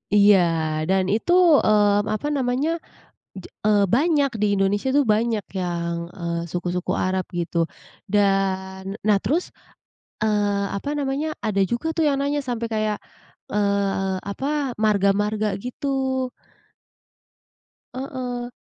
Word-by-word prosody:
Iya, 205 -1 +7 0.5
dan 190 -1 +3
itu, 225 +10 0 0.3
mmm, 205 -1 +4
apa 290 - -3
namanya, 260 +3 0 0.7
je - - -12 0.2
eee, 205 -1 +4
banyak 290 0 +3
di - - +4
Indonesia 200 +5 +1
tuh 290 - +4
banyak 220 -1 0 0.2
yang, 170 -1 -2 0.3
eee, 170 0 -2
suku-suku 175 0 -2
Arab, 185 0 -1
gitu. 170 0 -3 0.6
Dan 195 -2 +1 0.3
nah 210 -2 +5
terus, 310 - 0 0.7
eee, 205 -2 +1
apa 200 +8 -4
namanya, 280 +2 -1 0.2
ada 200 -2 +1
juga 240 +7 -1
tuh 325 - +3
yang 280 - +1
nanya 285 +1 0
sampai 235 -1 -2
kayak, 215 -1 0 0.6
eee, 200 -2 +1 0.2
apa, 275 +3 -2
marga-marga, 210 0 +2
gitu. 250 +5 -7 2.1
Heeh. 250 -2 -5
210 Hz, 115 wpm, -23 LUFS, 195-255 Hz, 2.1 s, Iya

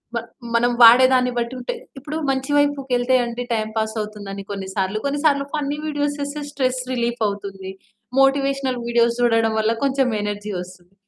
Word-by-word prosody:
మ - - +1 0.4
మనం 240 +1 +3
వాడే 240 +3 +9
దాన్ని 250 -1 +3
బట్టి 235 +1 -2
ఉంటాయి. 255 - -5 0.2
ఇప్పుడు 290 +3 -5
మంచి 270 +1 -1
వైపుకెళ్తే 265 -3 +1
అండి, 235 +1 -4
టైమ్ 220 -1 0
పాస్ 220 0 -1
అవుతుందని 205 -2 -6
కొన్ని 195 -1 -5
సార్లు, 190 +1 -1
కొన్ని 280 +1 -1
సార్లు 280 -2 +4
ఫన్నీ 295 -1 -2
వీడియోస్ 290 -1 -1
చేస్తే 285 +1 -4
స్ట్రెస్ 260 -3 -1
రిలీఫవుతుంది 205 -6 -2 0.5
మోటివేషనల్ 270 -1 +2
వీడియోస్ 235 0 +2
చూడడం 225 -2 +3
వల్ల 220 +1 +2
కొంచెం 270 -1 +2
ఎనర్జీ 205 0 -4
వస్తుంది. 180 0 -10
245 Hz, 155 wpm, -21 LUFS, 215-275 Hz, 0.5 s, వాడే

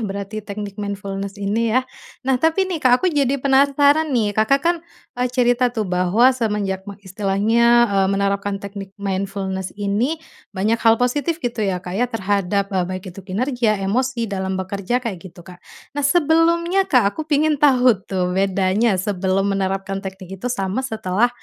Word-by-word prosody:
berarti 200 0 -4
teknik 205 -1 -7
mindfulness 200 0 -5
ini 210 +3 0
ya. 255 +3 +2 0.4
Nah 260 -1 +1
tapi 325 +5 +2
nih 360 -5 -4
Kak, 255 -1 +4
aku 370 - -1
jadi 280 -2 +1
penasaran 280 +3 +3
nih, 230 -7 +1
Kakak 220 +7 +2
kan, 345 +1 +3 0.4
e 250 +1 -1
cerita 245 0 +2
tuh 225 -3 -3
bahwa 185 +7 +3
semenjak 205 -5 -2
me 200 - -8
istilahnya, 215 +5 +3
eee, 195 -1 +3
menerapkan 200 0 0
teknik 195 0 -9
mindfulness 195 -1 -3
ini, 210 +9 0 0.3
banyak 210 +4 -1
hal 225 -1 +5
positif 280 +7 0
gitu 240 -2 -2
ya 195 -3 0
Kak 180 0 -7
ya 245 +6 0
terhadap, 200 -2 -1
e 180 -2 0
baik 185 0 -5
itu 195 - -10
kinerja, 220 +3 0
emosi 245 +3 0
dalam 190 -2 -3
bekerja 195 +4 -2
kayak 230 -8 -4
gitu 175 -1 -13
Kak. 180 -1 -13 0.3
Nah 290 - -3
sebelumnya 335 +5 +2
Kak, 230 -6 +3
aku 315 0 -6
pengen 300 0 +2
tahu 250 -7 +4
tuh 180 -2 -1
bedanya 195 +3 +1
sebelum 190 0 0
menerapkan 195 0 -2
teknik 190 -1 -8
itu 245 - -2
sama 200 -1 -2
setelah, 220 -3 0
210 Hz, 165 wpm, -20 LUFS, 195-250 Hz, 0.4 s, hal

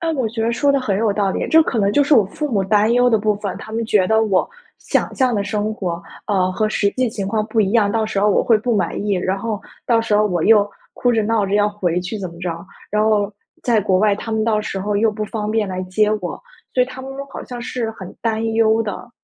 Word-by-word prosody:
呃， 330 -1 -1
我 260 -6 -1
觉 225 +1 -3
着 230 +1 +1
说 280 +4 +2
得 275 - +3
很 205 -6 -1
有 220 -2 +2
道 200 -1 0
理， - - -2
这 320 0 +6
可 245 - -2
能 200 -1 +2
就 290 - +4
是 290 - +4
我 220 -6 +5
父 300 +8 -4
母 200 -5 +1
担 210 +3 +3
忧 245 +1 +4
的 225 - +4
部 210 0 +1
分， 205 -2 -4
他 220 - -10
们 230 0 -1
觉 200 -4 +3
得 220 +2 +3
我 200 - +1 0.3
想 - - -1
象 255 -3 +2
的 205 - 0
生 210 +1 -2
活， 175 -5 -4 0.2
呃， 185 -3 +1
和 215 +3 0
实 205 -1 +1
际 255 +2 0
情 200 -3 -4
况 215 +2 0
不 225 0 0
一 195 -2 +2
样， 215 -4 +3
到 225 +1 0
时 210 -2 -2
候 210 - +3
我 205 - +3
会 225 -3 +4
不 235 +1 0
满 200 - -1
意， 205 -1 +1
然 185 +1 -1
后 215 0 -3 0.3
到 230 -2 +3
时 225 -2 0
候 210 +1 +4
我 175 -5 -1
又 210 -2 +5 0.2
哭 245 - +1
着 220 -2 +2
闹 215 -2 +1
着 195 - -1
要 205 0 +3
回 180 -4 -1
去 185 +4 -5
怎 190 -2 -4
么 170 - -13
着， 170 0 -5 0.2
然 210 +1 +1
后 210 -1 +2 0.3
在 235 -3 +2
国 185 -2 +2
外 210 0 +3
他 220 +2 -7
们 220 0 0
到 215 -2 +1
时 195 - -4
候 205 +2 -2
又 220 +1 +3
不 215 0 -4
方 210 -1 -4
便 220 -1 +1
来 185 0 -3
接 210 +3 +1
我， 175 - -6 0.3
所 250 - +4
以 - - 0
他 260 0 -9
们 265 +1 -8 0.2
好 - - -6
像 245 -1 -7
是 235 -2 -3
很 190 -4 -10
担 225 -1 -1
忧 225 0 +3
的。 215 +3 -6
215 Hz, 295 characters per minute, -19 LUFS, 200-225 Hz, 0.3 s, 这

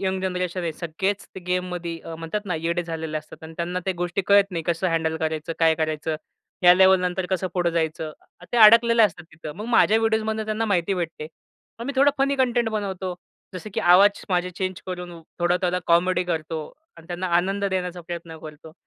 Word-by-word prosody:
Young 190 -1 -1
generation 180 -1 -2
आहे 165 -2 -2
सगळेच 185 +5 -3 0.2
गेममध्ये 180 -2 -2 0.2
म्हणतात 165 +6 -4
ना, 185 -4 -2
येडे 170 +2 -1
झालेले 160 -2 -4
असतात 155 +1 -14
आणि 160 - -9
त्यांना 175 +1 -2
त्या 190 - 0
गोष्टी 175 +2 -1
कळत 200 0 +5
नाही. 170 -3 -3
कसं 170 +2 0
हँडल 160 -1 0
करायचं? 160 0 -3
काय 160 -1 +4
करायचं? 155 0 -2 0.5
ह्या 180 0 +8
लेव्हलनंतर 185 -1 +3
कसं 185 0 0
पुढे 175 -2 +1
जायचं? 160 -1 -2 0.4
ते - - +1
अडकलेले 230 +1 +7
असतात 175 -5 +1
तिथं. 160 -1 -8
मग 210 - -6
माझ्या 225 -2 +4
व्हिडिओजमधनं 220 -1 0
त्यांना 215 +1 -1
माहिती 195 -2 +1
भेटते. 165 -4 -4 0.5
पण 235 - -6
मी 280 - -2
थोडा 280 +2 +5
फनी 275 +1 +2
कंटेंट 245 -3 +1
बनवतो. 195 -4 -3 0.4
जसं 185 +4 -7
की - - 0
आवाज 195 +4 +5
माझे 180 -1 0
चेंजकरून 180 -1 -5 0.2
थोडं 175 0 +2
त्याला 180 0 0
कॉमेडी 180 +1 +3
करतो 160 -2 -3 0.4
आणि 165 - -15
त्यांना 180 +1 -4
आनंद 195 +3 0
देण्याचा 180 -2 -2
प्रयत्न 170 -1 -7
करतो. 155 0 -11
180 Hz, 180 wpm, -24 LUFS, 165-195 Hz, 0.5 s, ह्या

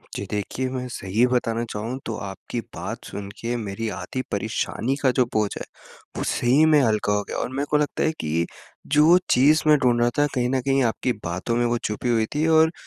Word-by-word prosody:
जी, 100 - -4
देखिए 110 +5 -2
मैं 125 -1 -4
सही 105 +2 +1
बताना 115 -2 0
चाहूँ 115 +5 -4
तो 115 - -3
आपकी 100 +4 -5 0.2
बात - - -5
सुन 100 -1 -7
के 120 +1 -2
मेरी 110 0 -4
आधी 100 +8 -4
परेशानी 110 +4 -1
का 130 -2 +4
जो 125 0 +2
बोझ 105 -2 +2
है, - - -5 0.5
वो - - -2
सही 130 +6 +3
में 155 -1 +5
हल्का 110 -4 +1
हो 105 0 0
गया - - -4
और - - -2
मेरे 140 +2 -2
को 150 - +3
लगता 150 -1 0
है 160 - +2
कि 80 +2 0 0.5
जो 155 +4 +7
चीज़ 145 +5 +5
मैं 150 -1 +7
ढूँढ़ 125 -4 +2
रहा 120 - +4
था 145 - +4
कहीं 125 0 +1
न 130 -1 +1
कहीं 135 0 +2
आपकी 120 +2 0
बातों 90 +7 -2
में 120 0 +2
वो 120 0 +1
छुपी 105 +3 -2
हुई 115 -2 +2
थी 155 - +1
और 160 0 +5
120 Hz, 220 wpm, -24 LUFS, 105-135 Hz, 0.5 s, जो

